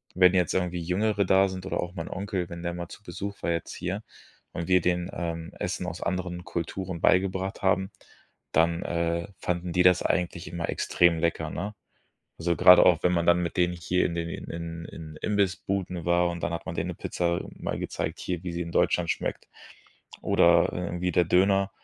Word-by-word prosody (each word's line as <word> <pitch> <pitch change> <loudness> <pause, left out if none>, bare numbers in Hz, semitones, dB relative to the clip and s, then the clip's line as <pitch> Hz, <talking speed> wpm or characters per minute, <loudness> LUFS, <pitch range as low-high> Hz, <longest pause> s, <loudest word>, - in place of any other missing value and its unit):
wenn 90 0 +6
jetzt 90 -3 +2
irgendwie 90 -1 -1
Jüngere 100 +4 +1
da 95 +1 +4
sind 95 0 -7
oder - - -2
auch 90 0 -5
mein 80 - -5
Onkel, 95 -2 -3
wenn 85 0 -7
der 85 0 -2
mal 85 -1 -5
zu 100 - -12
Besuch 100 +2 -6
war - - +1
jetzt 85 - -3
hier - - -4 0.5
und 85 - -4
wir 90 - +6
denen, 90 +1 0
ähm, 85 0 -4
Essen 90 0 -2
aus 90 -1 -6
anderen 90 -1 -3
Kulturen 85 +1 -4
beigebracht 95 +1 +1
haben, 95 0 +1 0.6
dann, 85 +1 +2
äh, 85 0 -1
fanden 90 0 -2
die 90 - +3
das 90 -1 +5
eigentlich 90 -1 -1
immer 85 0 -3
extrem 85 -2 +2
lecker, 80 -1 0
ne? 100 +5 -4 0.7
Also 85 +1 +1
grade 90 +4 +8
auch, 90 -2 +4
wenn 90 - +4
man 85 -1 +1
dann 85 0 +5
mit 85 - -4
denen 90 0 +2
hier 90 +1 0
in 85 - -2
den 85 0 -2
in - - -6
in 85 0 -6
in 80 -1 -9
Imbissbuden 95 -3 -1
war 85 0 +3
und 85 -1 -5
dann 85 - -1
hat 85 - -4
man - - -3
denen - - -2
'ne - - -8
Pizza, 85 -1 -1
mal - - -4
gezeigt, - - -3
hier, 90 -1 -3
wie 90 -2 -4
sie 85 - -3
in 85 0 -5
Deutschland 85 0 +2
schmeckt. - - -4 0.8
Oder, - - +4
äh, 90 -1 -4
wie 90 0 +1
der 90 - +4
Döner, 95 +2 +3
90 Hz, 205 wpm, -27 LUFS, 85-95 Hz, 0.8 s, grade